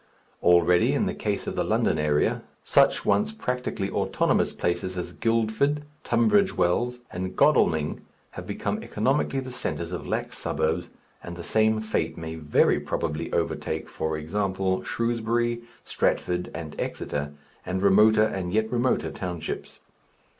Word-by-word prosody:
Already, 90 Hz, 0 st, +4 dB
in -, -, +1 dB
the -, -, -1 dB
case -, -, -2 dB
of -, -, -4 dB
the -, -, +1 dB
London 80 Hz, -, +1 dB
area, 75 Hz, -1 st, +1 dB, 0.2 s
such -, -, +3 dB
once 215 Hz, +1 st, +2 dB
practically 125 Hz, -, -3 dB
autonomous -, -, +1 dB
places 85 Hz, +1 st, -2 dB
as 90 Hz, -, -4 dB
Guildford, 115 Hz, +6 st, +1 dB, 0.2 s
Tunbridge 210 Hz, -4 st, +3 dB
Wells, 120 Hz, +8 st, +1 dB
and 95 Hz, +1 st, -4 dB
Godalming 80 Hz, -, +3 dB, 0.3 s
have -, -, -8 dB
become -, -, -2 dB
economically 135 Hz, +4 st, 0 dB
the 130 Hz, -1 st, -7 dB
centres 85 Hz, -8 st, -3 dB
of 90 Hz, -, -5 dB
lax -, -, -3 dB
suburbs, 80 Hz, +3 st, -1 dB, 0.3 s
and 85 Hz, -, -7 dB
the 85 Hz, -, -7 dB
same 110 Hz, +2 st, +2 dB
fate 95 Hz, -7 st, -2 dB
may 80 Hz, -1 st, -5 dB
very 75 Hz, -2 st, +2 dB
probably 80 Hz, +1 st, -3 dB
overtake, -, -, -2 dB
for 80 Hz, 0 st, -3 dB
example, 95 Hz, +3 st, -1 dB
Shrewsbury, 120 Hz, 0 st, 0 dB, 0.2 s
Stratford, 90 Hz, 0 st, 0 dB
and 80 Hz, -3 st, -7 dB
Exeter, 75 Hz, 0 st, -3 dB, 0.3 s
and 95 Hz, +1 st, -2 dB
remoter 105 Hz, +2 st, +6 dB
and 95 Hz, -4 st, -3 dB
yet 110 Hz, +2 st, +1 dB
remoter 125 Hz, +1 st, +1 dB
townships. 90 Hz, -3 st, -5 dB
95 Hz, 140 wpm, -26 LUFS, 85-120 Hz, 0.3 s, remoter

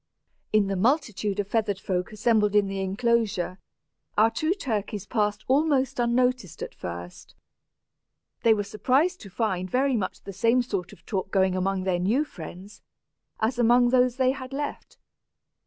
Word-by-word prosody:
In 215 Hz, -1 st, +4 dB
the 195 Hz, 0 st, -2 dB
multitude 215 Hz, -, 0 dB
of 200 Hz, -, -1 dB
feathered 210 Hz, -3 st, 0 dB
folk 180 Hz, -2 st, -2 dB
assembled 215 Hz, -1 st, +2 dB
in 205 Hz, -1 st, +5 dB
the 195 Hz, 0 st, -3 dB
enclosure, 195 Hz, -2 st, 0 dB, 0.6 s
our 220 Hz, +2 st, +5 dB
two 320 Hz, +7 st, 0 dB
turkeys 215 Hz, -, -3 dB
passed 210 Hz, -2 st, -1 dB
almost 270 Hz, -2 st, +2 dB
unnoticed 240 Hz, -, +1 dB
at -, -, -7 dB
first. 85 Hz, 0 st, -8 dB, 1.1 s
They 225 Hz, -1 st, +5 dB
were 205 Hz, -, -1 dB
surprised 265 Hz, -, +1 dB
to 200 Hz, -, -10 dB
find 185 Hz, -2 st, -2 dB
very 265 Hz, +3 st, +2 dB
much 190 Hz, -5 st, -3 dB
the 195 Hz, -, -7 dB
same 230 Hz, +6 st, +3 dB
sort 195 Hz, -7 st, -4 dB
of -, -, -17 dB
talk 190 Hz, -3 st, -3 dB
going 190 Hz, -1 st, +2 dB
on 185 Hz, -, -1 dB
among 190 Hz, 0 st, 0 dB
their 185 Hz, -2 st, 0 dB
new 225 Hz, +12 st, +1 dB
friends, 185 Hz, -, -10 dB, 0.6 s
as 235 Hz, +3 st, 0 dB
among 240 Hz, +1 st, +5 dB
those 250 Hz, -1 st, +3 dB
they 260 Hz, -1 st, +3 dB
had 260 Hz, 0 st, -7 dB
left. 290 Hz, +1 st, -5 dB
215 Hz, 160 wpm, -26 LUFS, 195-250 Hz, 1.1 s, in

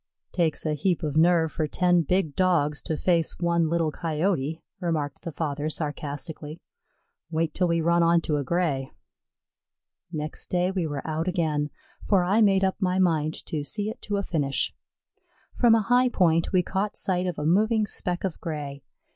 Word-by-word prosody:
"Takes 165 Hz, -4 st, 0 dB
a 155 Hz, -, +1 dB
heap 170 Hz, +4 st, 0 dB
of 150 Hz, -2 st, -2 dB
nerve 165 Hz, 0 st, +4 dB
for 155 Hz, -, -1 dB
ten 175 Hz, +2 st, +3 dB
big 165 Hz, -2 st, 0 dB
Dogs 165 Hz, -6 st, +2 dB
to 160 Hz, -, -3 dB
face 170 Hz, -2 st, +1 dB
one 170 Hz, -2 st, +1 dB
little 165 Hz, -2 st, +1 dB
Coyote," 160 Hz, -1 st, -1 dB, 0.2 s
remarked 155 Hz, -6 st, -2 dB
the 170 Hz, -, -5 dB
father, 150 Hz, -1 st, -2 dB
sarcastically. 150 Hz, +1 st, -4 dB, 0.7 s
"Wait 160 Hz, -1 st, -1 dB
till 180 Hz, -, +1 dB
we 170 Hz, -1 st, +1 dB
run 170 Hz, +1 st, +3 dB
onto 165 Hz, -2 st, +2 dB
a 145 Hz, -, -1 dB
Gray." 140 Hz, -4 st, -1 dB, 1.2 s
Next 155 Hz, -2 st, -5 dB
day 180 Hz, +1 st, +1 dB
we 185 Hz, -4 st, -1 dB
were 145 Hz, -2 st, -5 dB
out 160 Hz, +2 st, -2 dB
again, 155 Hz, -5 st, 0 dB, 0.3 s
for 195 Hz, -4 st, +3 dB
I 200 Hz, +5 st, +3 dB
made 195 Hz, -2 st, +4 dB
up 190 Hz, 0 st, +1 dB
my 185 Hz, -1 st, +1 dB
mind 160 Hz, -4 st, +1 dB
to 150 Hz, -2 st, -3 dB
see 210 Hz, +7 st, -2 dB
it -, -, -12 dB
to 205 Hz, -1 st, -2 dB
a 200 Hz, -, -1 dB
finish. 140 Hz, -6 st, -1 dB, 0.8 s
From 235 Hz, -2 st, +5 dB
a 225 Hz, -, +3 dB
high 250 Hz, +3 st, +3 dB
point 165 Hz, -7 st, +2 dB
we 185 Hz, -2 st, +3 dB
caught 200 Hz, +3 st, -2 dB
sight 185 Hz, -1 st, +1 dB
of 180 Hz, -, -3 dB
a 150 Hz, -, -3 dB
moving 215 Hz, +6 st, +3 dB
speck 180 Hz, -3 st, -3 dB
of 190 Hz, -4 st, -3 dB
gray. 145 Hz, -4 st, -5 dB
170 Hz, 175 wpm, -26 LUFS, 155-185 Hz, 1.2 s, From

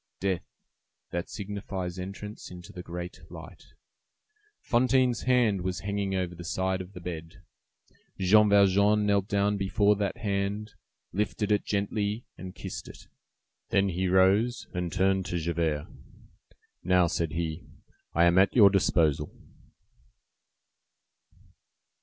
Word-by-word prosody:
Death, 95 Hz, -2 st, 0 dB, 0.7 s
that 85 Hz, +1 st, -3 dB
signifies 95 Hz, -3 st, -5 dB
entrance 100 Hz, +3 st, -7 dB
into 90 Hz, -1 st, -11 dB
the 90 Hz, -, -7 dB
great 90 Hz, +1 st, -7 dB
light. -, -, -11 dB, 0.9 s
Fantine's 125 Hz, 0 st, +2 dB
hand 120 Hz, -7 st, +3 dB
was 90 Hz, 0 st, -3 dB
hanging 100 Hz, -1 st, -2 dB
over 90 Hz, -2 st, -2 dB
the 85 Hz, 0 st, -9 dB
side 95 Hz, +1 st, -1 dB
of 90 Hz, +2 st, -10 dB
the 90 Hz, -, -8 dB
bed. 85 Hz, +1 st, -8 dB, 0.7 s
Jean 105 Hz, +3 st, +5 dB
Valjean 100 Hz, +1 st, +4 dB
knelt 100 Hz, -1 st, +2 dB
down 100 Hz, 0 st, +1 dB
before 100 Hz, +1 st, +2 dB
that 100 Hz, -2 st, -2 dB
hand, 100 Hz, 0 st, -2 dB, 0.4 s
lifted 105 Hz, +1 st, -1 dB
it 105 Hz, -, +2 dB
gently, 105 Hz, +2 st, -1 dB
and 95 Hz, -1 st, -9 dB
kissed -, -, -7 dB
it. -, -, -12 dB, 0.6 s
Then 100 Hz, -3 st, +2 dB
he 95 Hz, +1 st, -1 dB
rose, 95 Hz, +6 st, +3 dB
and 90 Hz, -1 st, -3 dB
turned 95 Hz, +1 st, +1 dB
to 90 Hz, -, -2 dB
Javert. 80 Hz, -3 st, -1 dB, 1.0 s
"Now," 90 Hz, 0 st, +4 dB
said 85 Hz, -1 st, -2 dB
he, 80 Hz, 0 st, -3 dB, 0.5 s
"I 85 Hz, -, +4 dB
am 85 Hz, +1 st, +5 dB
at 95 Hz, -, +3 dB
your 100 Hz, -5 st, +8 dB
disposal." 80 Hz, -6 st, +2 dB
95 Hz, 125 wpm, -28 LUFS, 90-105 Hz, 1.0 s, your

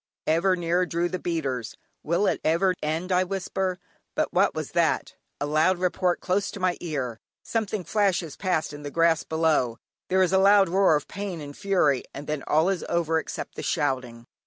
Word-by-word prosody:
Ever 170 Hz, +4 st, +3 dB
nearer 175 Hz, +1 st, 0 dB
drew 170 Hz, +1 st, 0 dB
the 185 Hz, -, -3 dB
beaters. 135 Hz, -10 st, -3 dB, 0.2 s
"Will 170 Hz, +6 st, +1 dB
it -, -, 0 dB
never 170 Hz, +4 st, +3 dB
end?" 160 Hz, +5 st, -2 dB
I 180 Hz, 0 st, +4 dB
whisper. 185 Hz, 0 st, -2 dB, 0.4 s
But -, -, 0 dB
what -, -, +3 dB
was -, -, -4 dB
that? -, -, +1 dB, 0.3 s
A -, -, -1 dB
loud 155 Hz, +5 st, +2 dB
report 180 Hz, 0 st, 0 dB
close 195 Hz, +2 st, 0 dB
to -, -, -8 dB
my 185 Hz, -1 st, +1 dB
ear; 130 Hz, -9 st, -4 dB, 0.2 s
something 215 Hz, -3 st, -2 dB
flashes 180 Hz, -4 st, 0 dB
past 180 Hz, -6 st, -1 dB
in 145 Hz, -, -8 dB
the 145 Hz, -, -5 dB
grass 165 Hz, +1 st, +3 dB
below, 155 Hz, -7 st, +1 dB, 0.3 s
there 190 Hz, 0 st, +4 dB
is 185 Hz, -, +1 dB
a 190 Hz, -, +5 dB
loud 195 Hz, -1 st, +6 dB
roar 190 Hz, -2 st, +4 dB
of 145 Hz, -, -2 dB
pain 200 Hz, -4 st, -5 dB
and 145 Hz, -1 st, -8 dB
fury, 180 Hz, -10 st, +2 dB
and 145 Hz, -, -7 dB
then 150 Hz, -1 st, -3 dB
"all 155 Hz, +3 st, +3 dB
is 195 Hz, -3 st, -1 dB
over 165 Hz, -1 st, +1 dB
except -, -, -6 dB
the -, -, -6 dB
shouting." 120 Hz, -3 st, -2 dB
170 Hz, 190 wpm, -26 LUFS, 150-185 Hz, 0.4 s, loud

